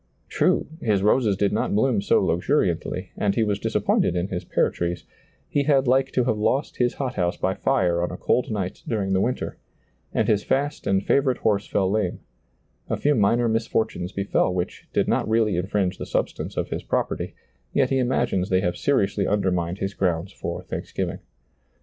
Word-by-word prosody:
True, - - +2 0.2
his 100 -4 +1
roses 105 -2 +3
did 100 +1 +1
not 105 - 0
bloom 110 -1 +2
so - - +3
luxuriantly, 90 - 0
and 100 -1 0
he 115 - +2
was 105 -2 0
disappointed 90 - +1
in 90 +2 -1
his 90 -1 -3
pear - - +1
trees; 85 -1 -3 0.4
he 145 - +1
had 135 -3 +3
like 130 +2 +3
to 125 - +2
have 110 -3 0
lost 135 +7 0
his 120 -1 +1
hothouse 125 -10 -1
by 95 - 0
fire 90 -3 +1
on 85 - 0
a 90 - -6
cold 125 - +1
night 100 -4 -3
during 100 -4 -1
the 95 - +2
winter; 125 +4 -2 0.5
and - - +1
his 105 -1 +2
fast 145 +2 -1
and 95 0 +1
favorite 135 -3 +2
horse 105 -2 0
fell 95 - +1
lame; 100 -2 0 0.7
a - - 0
few 150 - +2
minor 115 +1 +3
misfortunes 110 -4 -1
befell 100 -2 +1
which 90 -1 -4
did - - +1
not - - +1
really 110 -3 +2
infringe 95 +1 -1
the - - -5
substance - - -2
of - - -1
his - - -3
prop - - 0
erty, - - -4 0.4
yet 135 -2 +2
he 135 - +2
imagines 120 -7 0
they 95 0 +3
have 90 -1 0
seriously 100 -7 +1
under 100 -2 +1
mined 90 0 -1
his 95 0 -3
grounds 90 -1 -1
for - - -5
thanksgiving. - - -4
100 Hz, 190 wpm, -24 LUFS, 95-120 Hz, 0.7 s, roses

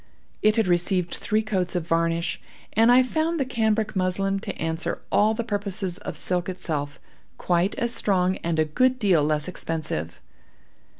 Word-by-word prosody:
It 215 0 +4
had 225 -2 +2
received 175 0 +1
three 215 +1 0
coats 190 -5 -2
of 175 -3 -1
varnish, 165 0 0 0.3
and 225 +3 +5
I 255 +1 +6
found 315 +5 -1
the 270 - +1
cambric 220 -3 0
muslin 195 +1 0
to - - -6
answer 165 +1 -2
all 215 +2 +3
the 235 - -2
purposes 200 -4 -2
of - - -5
silk 180 -1 -1
itself, 150 -5 -4 0.4
quite 175 +2 +1
as 235 -3 +1
strong 185 -4 +2
and 170 -1 -2
a 155 - +3
good 255 +12 +2
deal 190 - +3
less 150 0 0
expensive. 155 - -4
185 Hz, 165 wpm, -24 LUFS, 170-220 Hz, 0.4 s, I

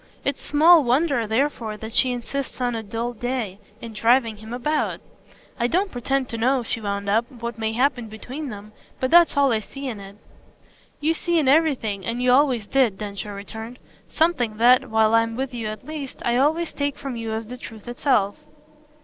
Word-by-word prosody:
It's 280 - 0
small 315 +2 +6
wonder 255 -2 +1
therefore 225 -2 -1
that 220 +1 -8
she 255 +1 +4
insists, 260 +3 -4
on 245 -1 0
a 225 - -3
dull 230 +3 -4
day, 235 -4 -3 0.2
in 230 -1 -8
driving 230 +1 +2
him 220 +2 -11
about. 295 +6 -1 0.6
I 235 - +2
don't 375 +8 0
pretend 265 +2 -1
to 230 - -4
know," 255 +2 +2
she 230 0 -3
wound 200 -1 -3
up, 225 +4 +1
"what 235 -3 -7
may 220 0 -1
happen 245 -1 +1
between 255 +7 -7
them; 210 -1 -9 0.3
but 260 - -1
that's 345 -3 +6
all 280 -2 +4
I 220 - +2
see 275 +6 -8
in 225 -5 -5
it." 195 0 -11 0.9
"You 315 +2 +2
see 345 +1 0
in 300 -4 +2
everything, 265 -9 +2
and 230 +4 -3
you 250 0 +3
always 255 -5 +3
did," 245 -5 +2
Densher 205 0 -6
returned, 220 +4 -8 0.3
"something 270 -10 +1
that, 250 +3 +5
while 220 0 +3
I'm 230 0 +3
with 265 +1 -3
you 230 -3 -4
at 215 +2 -7
least, 295 -3 -6
I 240 - +2
always 310 +6 +1
take 285 -1 -2
from 275 -3 -5
you 225 -1 -4
as 220 0 -3
the 245 +3 -8
truth 225 -3 -11
itself." 240 -5 +1
240 Hz, 195 wpm, -23 LUFS, 220-275 Hz, 0.9 s, small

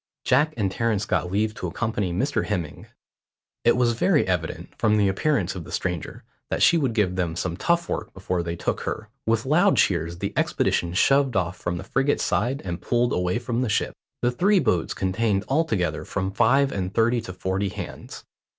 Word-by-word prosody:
Jack 150 +5 +3
and 100 -4 0
Terence 110 -1 0
got 90 - -1
leave 105 +2 +1
to 90 - -5
accompany 105 0 -2
Mr 130 +12 -1
Hemming. 85 -8 -4 0.8
It 120 - +4
was 120 -1 +3
very 150 - +2
evident, 90 -3 -3
from 105 0 +2
the 100 -1 +3
appearance 95 - 0
of 90 -3 -6
the - - -11
stranger, 90 -3 -3 0.3
that - - 0
she - - +6
would 135 -8 +1
give 95 -5 +1
them 85 -3 -1
some 85 0 -2
tough 170 - +1
work - - -3
before 90 -2 -2
they 85 0 -3
took - - -2
her. 105 - -4 0.2
With 115 +1 +1
loud 175 +8 +4
cheers 85 -2 +1
the - - -3
expedition 85 0 0
shoved 135 +4 +3
off 90 -1 0
from 85 - -3
the - - -6
frigate's 135 +2 0
side 130 +5 0
and 90 -1 -4
pulled 120 0 +1
away 90 +4 0
for 120 0 -5
the 120 0 0
ship. 105 - 0 0.3
The 120 - +3
three 195 +11 +3
boats 110 - +1
contained 100 +1 0
altogether 110 - 0
from 95 -1 -3
five 135 +6 +3
and 95 -1 -3
thirty 115 +2 +2
to 110 - -7
forty 95 +2 -1
hands. - - -8
105 Hz, 195 wpm, -24 LUFS, 90-125 Hz, 0.8 s, she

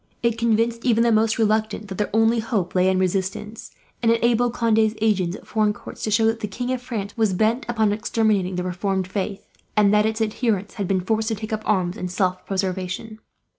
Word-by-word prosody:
It 235 -1 +2
convinced 230 0 +1
even 230 -2 +3
the 235 - +3
most 220 0 +2
reluctant 215 -1 0
that 190 0 -7
their 210 - 0
only 225 +2 +3
hope 220 -6 -2
lay 185 0 +3
in 190 - +2
resistance; 190 +3 -2 0.3
and 230 -1 +3
enabled 235 +1 +2
Conde's 220 -1 +2
agents, 195 -5 +1
at - - -12
foreign 215 -1 +1
courts, - - -11
to - - -1
show 215 +2 +3
that 225 0 +1
the 210 - -3
King 245 +5 -4
of 255 -1 -2
France 215 -5 -5
was 220 -4 +1
bent 220 +6 +1
upon 220 -3 +2
exterminating 210 -3 0
the 180 - -2
reformed 185 +1 -2
faith, 195 +1 -4 0.3
and 205 -1 +5
that 210 +1 +4
its 220 0 -2
adherents 215 -2 -1
had 200 -4 -3
been 185 -1 +1
forced 220 +3 0
to 225 - 0
take 215 +2 -6
up 215 - -2
arms, 185 -2 +1
in 180 - -3
self 185 0 -1
preservation. 190 +3 -3
215 Hz, 210 wpm, -23 LUFS, 195-225 Hz, 0.3 s, and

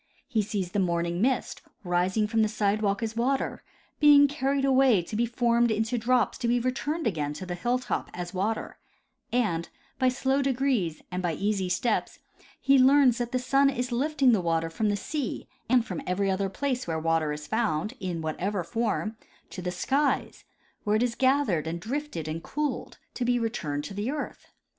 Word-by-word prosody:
He 235 -6 +1
sees 200 -4 -3
the 205 - 0
morning 170 -1 0
mist, 255 +2 0 0.2
rising 180 +4 +1
from 225 +1 +1
the 215 - +4
sidewalk 210 0 0
as 225 0 -3
water, 260 +4 0 0.4
being 290 -1 +7
carried 275 -1 0
away 260 -8 +4
to 210 - -7
be 235 +2 +1
formed 235 0 +2
into 220 +2 0
drops 240 -2 +1
to 240 - -1
be 240 +1 +3
relurned 270 +6 -2
again 150 -9 -1
to 170 +5 -7
the 180 - -4
hilltop 245 +8 -1
as 175 0 -6
water; 205 +4 -2 0.5
and, 205 -9 0 0.3
by 255 - +4
slow 265 +2 +1
de 270 -1 +1
grees 240 - 0
and 180 +1 -2
by 175 -2 -1
easy 195 +2 -1
steps, 215 +5 0 0.4
he 275 0 +4
learns 260 -2 +5
that 240 0 -2
the 255 - +1
sun 275 +2 +3
is 250 -1 -3
lifting 275 +1 +2
the 215 -5 +3
water 165 -1 0
from 215 +6 0
the 205 - +1
sea 280 +5 -4 0.2
and 245 -2 +4
from 180 -7 -5
every 195 +2 +1
other 195 +1 0
place 255 +2 -2
where 165 -1 -1
water 160 -1 +1
is 150 0 -5
found, 215 0 -1
in 180 -4 -3
whatever 180 +5 -2
form, 220 +2 -2 0.3
to 185 - -6
the 180 - -2
skies, 275 +11 0 0.4
where 210 0 +1
it 220 - +2
is 245 -2 0
gathered 260 - +2
and 170 +1 -3
drifted 235 - -4
and 160 +1 -4
cooled, 295 - -3 0.2
to 250 - -3
be 245 0 +2
returned 170 -11 -2
to 150 - -7
the 205 +5 -2
earth. 295 +1 -5
220 Hz, 190 wpm, -27 LUFS, 180-255 Hz, 0.5 s, being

